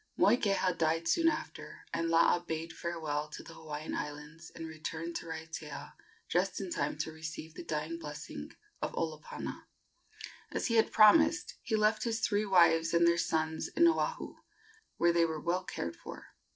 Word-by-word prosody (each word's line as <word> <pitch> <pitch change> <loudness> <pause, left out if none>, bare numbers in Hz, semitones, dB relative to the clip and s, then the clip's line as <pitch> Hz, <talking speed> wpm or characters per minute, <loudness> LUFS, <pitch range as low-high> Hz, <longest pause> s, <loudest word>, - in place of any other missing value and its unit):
Moikeha 195 -5 +3
died 165 +1 +1
soon 330 - +3
after, 315 - -6
and 165 0 0
Laa 165 +1 +5
bade 165 -1 -5
farewell 155 -3 -3
to 150 - -8
the - - -11
Hawaiian 155 0 -6
Islands 150 +3 -6
and 165 -1 -6
returned 160 +1 -5
to - - -8
Raiatea 160 -2 -7 0.3
just 185 +1 0
in 190 -2 -5
time 145 -1 -1
to 155 +1 -3
receive 160 0 -7
the - - -8
dying 155 +2 -3
blessing 150 -2 -7 0.3
of - - -2
Olopana. 155 -2 -4 0.9
As - - -2
he 230 - +1
had 220 - +4
promised, 310 +11 +6
he 225 - -1
left 215 0 +3
his 230 -2 -1
three 210 -2 +1
wives 170 -3 +5
and 170 0 +5
their 170 0 +3
sons 160 -1 0
in 340 - +4
Oahu, - - 0 0.6
where 170 0 +4
they 170 0 +4
were 160 -1 -1
well 175 +4 0
cared 85 0 -4
for. - - -10
165 Hz, 165 wpm, -32 LUFS, 160-190 Hz, 0.9 s, promised